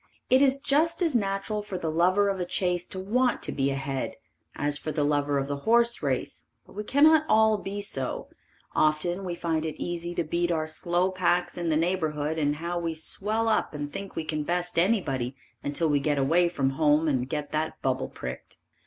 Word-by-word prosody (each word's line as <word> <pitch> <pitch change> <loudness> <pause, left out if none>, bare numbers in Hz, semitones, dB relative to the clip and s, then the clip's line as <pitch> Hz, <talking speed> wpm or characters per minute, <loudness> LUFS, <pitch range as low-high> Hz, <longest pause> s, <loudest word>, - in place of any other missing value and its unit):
It 260 +1 +6
is 275 -1 +4
just 315 +5 +2
as 320 -6 +1
natural 200 0 -1
for 200 -2 -5
the 165 -3 -2
lover 185 +5 +3
of 195 -1 -1
a 180 - -1
chase 180 -1 0
to 190 - -7
want 245 +6 +1
to - - -2
be 135 0 0
ahead, 135 -1 -3 0.4
as 145 0 +1
for 155 - -4
the 150 -1 0
lover 145 -1 +1
of 135 - 0
the 140 0 -2
horse 235 +8 +2
race, - - -2 0.2
but - - -17
we 210 - -4
cannot 305 +6 +5
all 220 -1 +4
be 200 +1 -5
so; 135 -10 -2 0.5
often 155 +5 +1
we 175 -2 -3
find 165 -2 -1
it 160 -1 -5
easy 175 0 -4
to 170 - 0
beat 170 +2 -1
our 160 -2 0
slow 175 +4 0
packs 175 -1 +1
in 175 -1 -2
the 155 - +2
neighborhood 160 -3 -1
and 145 -1 +1
how 170 +3 -3
we 165 -1 -2
swell 215 +7 0
up 220 -7 +1
and 145 0 -5
think 195 -1 -6
we 160 - -2
can 155 0 -2
best 175 +2 -1
anybody 140 - +1 0.3
until 145 +3 0
we 145 -2 +2
get 145 +1 0
away 165 +6 +3
from 135 -6 0
home 150 +2 +3
and 130 -3 0
get 145 +1 -3
that 155 +1 -2
bubble 130 -1 0
pricked. 65 0 -8
170 Hz, 205 wpm, -27 LUFS, 150-195 Hz, 0.5 s, It